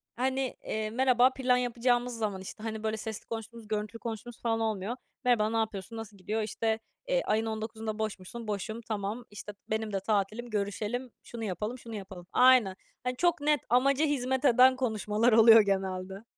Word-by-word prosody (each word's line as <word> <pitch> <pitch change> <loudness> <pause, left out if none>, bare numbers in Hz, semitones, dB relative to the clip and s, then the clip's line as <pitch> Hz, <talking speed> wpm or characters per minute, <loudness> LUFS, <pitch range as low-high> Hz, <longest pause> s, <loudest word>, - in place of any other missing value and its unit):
hani, 260 +1 -1
eee, 215 0 -2
merhaba 255 +2 +4
plan 255 -2 +2
yapacağımız 245 0 0
zaman, 205 -4 -2
işte, 200 +3 -9
hani, 220 -1 -4
böyle 220 0 -1
sesli 220 -1 -6
konuştuğumuz, 230 0 -7
görüntülü 215 +1 -3
konuştuğumuz 230 +1 -7
falan 225 -1 0
olmuyor. 220 +1 -1 0.3
"Merhaba, 225 -4 +3
ne 225 - -1
yapıyorsun, 220 0 -3
nasıl 215 -2 -8
gidiyor?" 210 +4 -2
İşte, 220 +1 -1 0.3
eee, - - +2
"Ayın 220 +1 +1
19'unda 220 0 -4
boş 215 -2 -2
musun?" 220 +5 -8
"Boşum." 215 +3 -3
"Tamam." 215 +1 -4
İşte, 205 0 -8 0.2
"Benim 220 -1 -2
de 195 - +1
tatilim, 215 +4 -1
görüşelim." 215 +4 -2
"Şunu 235 -1 -7
yapalım, 210 +4 -3
şunu 230 -2 -9
yapalım." 190 -3 -8
Aynen. 250 -7 +5 0.3
Hani, 250 0 -1
çok 345 -1 +2
net, 295 -1 +3
amaca 275 +5 +4
hizmet 265 -1 0
eden 255 +1 +6
konuşmalar 220 -2 +1
oluyor 225 0 +9
genelde. 190 0 -2
225 Hz, 170 wpm, -30 LUFS, 210-245 Hz, 0.3 s, oluyor